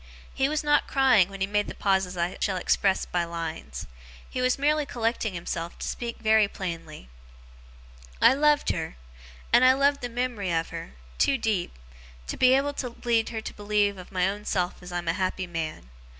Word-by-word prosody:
He 270 +1 +1
was 305 0 -1
not 295 0 +3
crying 255 -9 +4
when 195 -1 -9
he - - +3
made 205 +1 0
the - - -7
pauses 190 -2 0
I 175 +1 -1
shall 195 -3 0
express 190 +2 +1
by 175 -1 -1
lines. 165 - -5 0.4
He 255 - -4
was 255 0 +2
merely 300 +2 +2
collecting 230 -6 -2
himself 170 0 -4
to - - -5
speak 235 -1 -4
very 220 -1 +4
plainly. 165 - -6 1.1
'I - - +7
loved 295 +1 +3
her - - -4 0.6
and 250 - +7
I 255 0 +7
love 280 +1 +2
the 245 - -4
mem'ry 240 -6 -2
of 165 -1 0
her 65 - -7 0.2
too 275 - +3
deep 205 - -1 0.5
to - - -4
be 255 0 +5
able 285 +1 +1
to 250 -3 -6
lead 230 -2 +2
her 225 -2 -4
to - - -7
believe 205 -1 0
of 180 - -11
my 185 -1 +1
own 205 +2 -3
self 180 -4 -1
as 180 0 -9
I'm 175 -1 -3
a 165 - +2
happy 185 0 -1
man. 160 - -5
205 Hz, 195 wpm, -26 LUFS, 175-250 Hz, 1.1 s, I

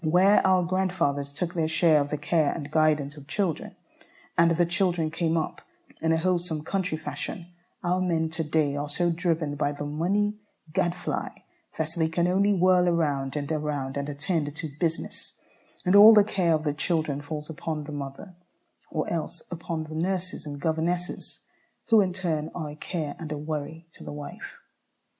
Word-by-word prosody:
Where 180 +6 +5
our 185 -1 +4
grandfathers 170 -6 0
took 175 +4 -3
their 165 -3 +1
share 160 -1 +4
of 145 - -2
the 150 - -1
care 155 0 +2
and 145 -3 -6
guidance 155 -2 +2
of 140 -1 -12
children, 180 -2 -2 0.6
and 170 0 +5
the 170 +1 +3
children 175 -3 0
came 165 0 0
up 160 - -2 0.4
in 160 - +2
a 165 - +4
wholesome 170 -2 0
country 185 -2 -1
fashion, 155 +3 -5 0.4
our 180 +1 +1
men 165 -3 0
to 160 0 -2
day 150 -2 +1
are 145 0 -3
so 175 +4 +1
driven 165 -3 0
by 145 0 0
the 145 0 -5
money 200 +8 0 0.3
gadfly 175 +1 -1 0.5
that 160 -1 0
they 160 -2 +2
can 170 +2 +1
only 195 +3 +3
whirl 180 -1 +4
around 145 -5 0
and 145 +1 -3
around 150 -3 -2
and 140 +1 -2
attend 145 0 -1
"to 160 0 -5
business," 165 -1 -3 0.5
and 180 +2 +4
all 215 +2 +10
the 210 - +8
care 180 -5 +2
of 155 - -2
the 150 -2 0
children 155 -2 -1
falls 150 0 -5
upon 160 -1 -4
the 150 - -8
mother, 145 +6 -7 0.6
or 155 - -2
else 170 0 -3
upon 165 -1 -3
the 155 0 -9
nurses 185 +1 -2
and 145 -1 -6
governesses, 170 +3 -2 0.4
who 225 -2 +7
in 190 -2 +1
turn 165 -4 -2
are 155 -4 -4
a - - -9
care 155 -2 -4
and 155 -2 -6
a 150 - -2
worry 155 +2 -5
to - - -13
the - - -7
wife. 145 -1 -8
160 Hz, 180 wpm, -27 LUFS, 150-180 Hz, 0.6 s, all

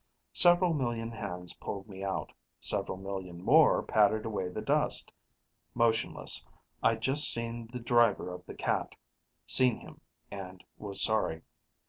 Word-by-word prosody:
Several 175 0 +5
million 120 -5 -2
hands 90 -6 -5
pulled 100 +1 -7
me 95 -2 -9
out; 95 -1 -3 0.3
several - - -2
million 95 -2 -6
more - - +5
patted 110 +1 +2
away 100 -5 -3
the 90 - -6
dust. - - +2 0.6
Motionless, 115 -1 +1 0.4
I'd 115 0 +2
just 140 +5 +4
seen 115 0 -5
the 125 - -5
driver 115 -6 +2
of 90 - -9
the - - -8
cat. - - -2 0.5
Seen 125 +8 +3
him - - -14 0.3
and 95 -2 -8
was 100 -2 -2
sorry. 105 -7 0
110 Hz, 135 wpm, -30 LUFS, 95-115 Hz, 0.6 s, Several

